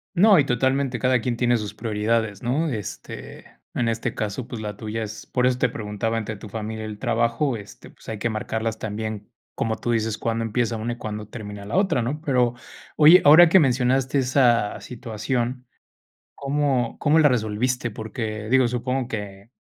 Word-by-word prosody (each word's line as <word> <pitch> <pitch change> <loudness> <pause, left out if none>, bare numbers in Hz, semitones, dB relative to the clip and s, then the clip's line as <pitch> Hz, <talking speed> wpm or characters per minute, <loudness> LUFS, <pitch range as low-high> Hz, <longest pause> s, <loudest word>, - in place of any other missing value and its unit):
No, 195 0 +6
y 140 - +3
totalmente 130 0 +1
cada 130 -1 +2
quien 120 0 -2
tiene 120 0 +2
sus 105 -1 -5
prioridades, 110 -1 -1
¿no? 145 +7 0
Este, 110 -7 -7 0.3
en 120 - 0
este 115 0 -2
caso, 105 +3 -3
pues, 115 -3 -6
la 105 -1 -5
tuya 110 +1 -4
es 110 0 -8
por 125 -1 0
eso 125 0 +2
te 125 - +2
preguntaba 110 +1 -3
entre 110 -1 -4
tu 105 - -10
familia 110 +1 -5
y - - -5
el 105 - -7
trabajo, 120 +3 0
este, 105 -2 -11
pues, - - -14
hay 110 - -4
que 120 - 0
marcarlas 110 +1 -3
también. 110 0 -5 0.2
Como 110 -1 -1
tú 120 - -3
dices, 110 -1 0
cuándo 115 0 -1
empieza 115 +1 -1
una 115 +2 -3
y - - -10
cuándo 105 -2 -6
termina 105 -3 -8
la 105 - -4
otra, 190 -10 +2
¿no? 145 +6 -3
Pero, 125 -6 +2 0.4
oye, 160 +4 +8
ahora 160 +3 +9
que 190 - +7
mencionaste 130 -1 +2
esa 125 -5 +2
situación, 120 +1 -3 0.7
¿cómo 140 -4 0
cómo 155 +1 +3
la 155 - +6
resolviste? 125 0 0
Porque, 110 0 -5
digo, 130 -1 +4
supongo 125 +1 -2
que 105 -2 -7
115 Hz, 185 wpm, -23 LUFS, 110-130 Hz, 0.7 s, ahora